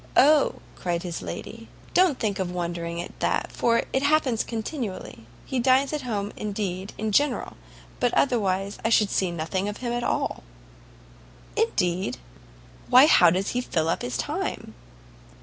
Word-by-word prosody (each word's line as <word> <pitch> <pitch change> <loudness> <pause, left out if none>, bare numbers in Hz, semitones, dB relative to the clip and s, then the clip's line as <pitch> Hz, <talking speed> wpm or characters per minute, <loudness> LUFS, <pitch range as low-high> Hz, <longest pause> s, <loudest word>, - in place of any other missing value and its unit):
"O!" 295 +2 +5 0.2
cried 175 -1 -2
his 175 -2 -4
lady, - - -7 0.3
"don't 360 -7 +4
think 210 -2 -2
of 185 -2 -1
wondering 170 -1 -3
at 175 - -7
that, - - 0
for 230 -1 +2
it 265 - +2
happens 285 -5 +2
continually. 220 - -5 0.2
He 260 - -2
dines 260 +3 +3
at 300 - -1
home, 210 -5 -3
indeed, 200 -2 -4
in 220 0 -2
general, 280 +3 +1 0.4
but 245 - +2
otherwise 200 -6 +1
I 225 - +1
should 215 -3 +3
see 190 - +1
nothing 175 +4 -2
of 205 - -6
him 240 -1 -3
at 240 0 -2
all." - - -1 1.1
"Indeed? 175 -6 0 0.7
why, 255 +3 +8
how 180 - +7
does 185 +4 0
he 245 - -1
fill 165 -9 -1
up - - 0
his 120 -1 -3
time?" - - -3
210 Hz, 155 wpm, -25 LUFS, 180-250 Hz, 1.1 s, why